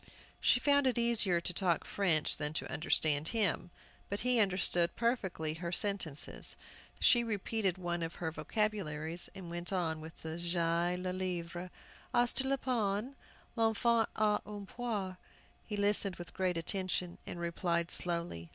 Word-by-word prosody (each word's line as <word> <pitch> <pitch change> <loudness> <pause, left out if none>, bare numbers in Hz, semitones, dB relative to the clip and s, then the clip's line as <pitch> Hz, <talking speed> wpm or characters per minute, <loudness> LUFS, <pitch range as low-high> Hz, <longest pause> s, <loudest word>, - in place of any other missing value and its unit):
She 245 - +4
found 285 0 +3
it 250 - +2
easier 230 -7 +3
to 175 +1 -2
talk 175 -2 +1
French 170 -7 +2
than 150 0 -2
to - - -2
understand 155 0 +2
him. 210 -5 +1 0.4
But 200 - -2
he 250 -1 +3
understood 185 -3 +2
perfectly 190 -10 -1
her 170 +2 -5
sentences. 180 -6 -1 0.4
She 240 -1 +5
repeated 210 -3 -1
one 175 -1 -2
of 165 0 -4
her 160 -2 -3
vocabularies, 170 -5 -1
and 180 -3 -8
went 175 +1 -3
on 165 -4 -1
with 160 +1 -11
"J'ai 170 +1 0
le 180 0 -3
livre." 180 -1 -4 0.5
"As 240 0 +4
tu 265 - +1
le 275 - +2
pain?" 235 -1 -1 0.4
"L'enfant 225 0 +2
a 210 -1 +2
une 205 -1 -7
poire." 205 -5 -3 0.5
He 210 - -3
listened 200 -2 +3
with 175 0 -7
great 185 -2 0
attention, 180 0 -1
and 175 - -6
replied 170 0 -1
slowly. 170 - 0
185 Hz, 150 wpm, -33 LUFS, 170-215 Hz, 0.5 s, She